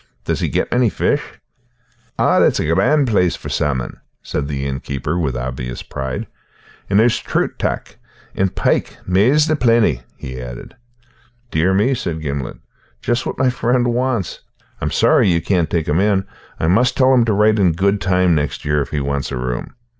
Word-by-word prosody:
"Does - - -1
he - - 0
get - - -1
many 120 -1 +3
fish?" - - 0 1.0
"Oh, - - +3
it's - - +3
a - - 0
grand 100 - +3
place 90 -6 +2
for - - -8
salmon," 65 -4 -2 0.2
said 70 - -3
the 70 -2 -3
inn 65 -1 -2
keeper 70 +6 -3
with 70 -7 -1
obvious 60 -1 -5
pride. 65 -1 -4 0.6
"And 100 +1 +4
there's 115 +1 +3
troots - - -1
tac. - - -3 0.4
And 95 -1 -1
pike, - - 0
mair's 115 +12 +4
the 155 -1 +1
peety," 115 - +2 0.2
he 65 -1 -7
added. 60 -1 -9 0.8
"Dear 90 +4 +2
me," 110 +7 +3
said 85 -10 -3
Gimblet, 70 -4 -4 0.5
"just 120 0 0
what - - -4
my 130 -1 +2
friend 120 -1 +1
wants. 125 -7 -1 0.4
I'm - - 0
sorry - - +3
you 85 - +2
can't 85 -1 0
take 80 -2 -1
him 75 +4 +2
in. 100 -1 +2 0.3
I - - 0
must 125 +9 +2
tell 130 0 +5
him 125 -2 +5
to 110 - +1
write 105 +1 +3
in 90 -4 +3
good 100 +4 +1
time 90 -1 +2
next 75 -1 -2
year 75 0 +1
if 70 - -4
he 75 - -2
wants 70 0 -2
a 65 - -3
room." 60 -1 -4
90 Hz, 185 wpm, -19 LUFS, 70-115 Hz, 1.0 s, tell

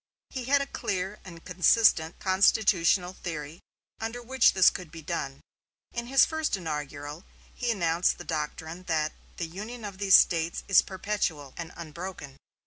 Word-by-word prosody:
He 255 -2 -5
had 280 +2 +3
a - - -5
clear 195 -6 -3
and 170 -3 -12
consistent 180 -2 +3
constitutional 185 -2 +3
theory 160 -3 -6 0.4
under 225 +2 -4
which 250 +1 +3
this 190 -2 +6
could 180 -3 -8
be 165 -1 -10
done. 140 -5 -4 0.5
In 235 0 -4
his 270 +2 +5
first 315 -8 -1
inaugural 150 -1 -5 0.3
he 245 - -3
announced 175 -5 +1
the - - -8
doctrine 160 +3 -5
that 155 -2 0 0.2
"the 170 - -2
union 210 +7 -8
of 195 -2 -8
these 195 -2 +6
States 165 0 +3
is 195 - +6
perpetual" 185 -8 -3
and 170 -1 -7
"unbroken." 170 -3 -8
180 Hz, 150 wpm, -28 LUFS, 160-210 Hz, 0.5 s, this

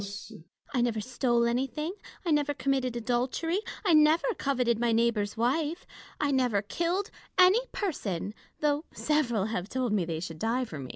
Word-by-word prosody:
I 250 - +2
never 235 -2 +1
stole 240 +1 +1
anything; 270 +7 -1 0.3
I 335 - +1
never 295 -1 +2
committed 260 -3 0
adultery; 250 - 0 0.3
I 355 - +4
never 310 +9 +5
coveted 250 -4 +1
my 240 0 +2
neighbour's 225 -2 +1
wife; 295 +8 0 0.3
I 290 -1 +1
never 250 -7 +2
killed 345 - -1 0.3
any 385 +7 +6
person, 205 - -3 0.3
though 300 +1 +1
several 245 -10 +1
have 210 -3 -3
told 255 -4 -1
me 200 -4 +2
they 165 -1 -3
should 165 -2 -6
die 240 +5 0
for 155 -10 -8
me. 130 -2 -7
255 Hz, 160 wpm, -29 LUFS, 225-300 Hz, 0.3 s, any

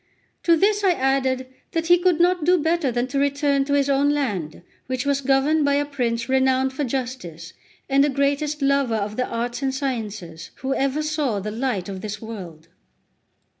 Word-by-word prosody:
To 335 -1 +4
this 410 +4 +2
I 375 -2 +4
added 265 -2 0 0.3
that 330 -1 0
he 350 +1 +5
could 355 -2 +2
not 355 -1 +3
do 360 +3 +4
better 320 -3 +1
than 240 +1 0
to 275 - -1
return 280 0 +1
to 285 - -1
his 280 -1 +2
own 280 +1 +3
land, 200 - -2 0.2
which 255 0 -2
was 280 -1 +1
governed 275 +3 +2
by 285 0 +2
a 290 +1 +1
prince 235 -5 -2
renowned 265 0 +2
for 290 - -2
justice, 235 - -5 0.3
and 275 0 +4
the 295 - +2
greatest 285 +2 0
lover 275 -4 +2
of 210 0 -2
the 250 - -1
arts 240 +2 -3
and 270 -1 0
sciences 220 - -4
who 265 +1 -2
ever 275 +3 0
saw 300 -8 -1
the 210 +2 -4
light 225 -5 -2
of 190 -2 -6
this 215 0 -5
world. 180 -8 -9
270 Hz, 190 wpm, -23 LUFS, 230-290 Hz, 0.3 s, he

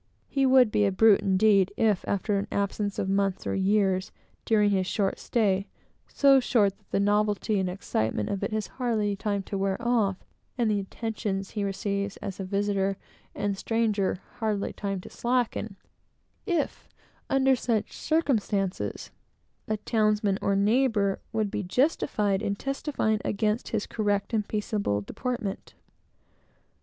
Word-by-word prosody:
He 275 -1 +1
would 255 -4 +6
be 210 - +2
a - - +1
brute 210 +1 +5
indeed, 195 0 +3
if, 215 -5 +2
after 200 +1 0
an 200 - -4
absence 200 0 -1
of 190 - -1
months 195 -1 0
or - - -1
years, 195 -1 +1 0.3
during 210 -2 +3
his 190 -2 +1
short 195 -1 0
stay, 200 -4 +1 0.4
so 275 -1 +5
short 210 -6 +2
that - - -35
the - - 0
novelty 205 0 +1
and 185 -1 0
excitement 110 - -2
of 200 - -2
it - - -2
has 215 -1 -1
hardly 220 -5 -1
time 200 0 -2
to 195 +1 -4
wear 195 0 0
off, 220 -6 +1 0.4
and 235 -3 +2
the 205 - +1
attentions 200 -1 -4
he 210 - -2
receives 200 0 -2
as 195 -1 -6
a - - -2
visitor 195 0 0 0.4
and 205 -1 -1
stranger 215 -5 0 0.2
hardly 215 -3 -1
time 195 -2 -3
to - - -11
slacken, 240 -4 -1 0.7
if, 340 -6 -1 0.4
under 270 0 +4
such 225 -3 -1
circumstances, 215 - -1 0.6
a 215 - 0
townsman 215 -2 +1
or 200 - +1
neighbor 210 -1 +2
would 215 -2 -1
be - - -2
justified 210 - +1
in 200 -2 -1
testifying 270 -4 -1
against 215 +3 0
his 220 -2 -2
correct 205 0 -1
and 210 -2 0
peaceable 205 - -1
deportment. 225 - -4
205 Hz, 150 wpm, -27 LUFS, 195-225 Hz, 0.7 s, would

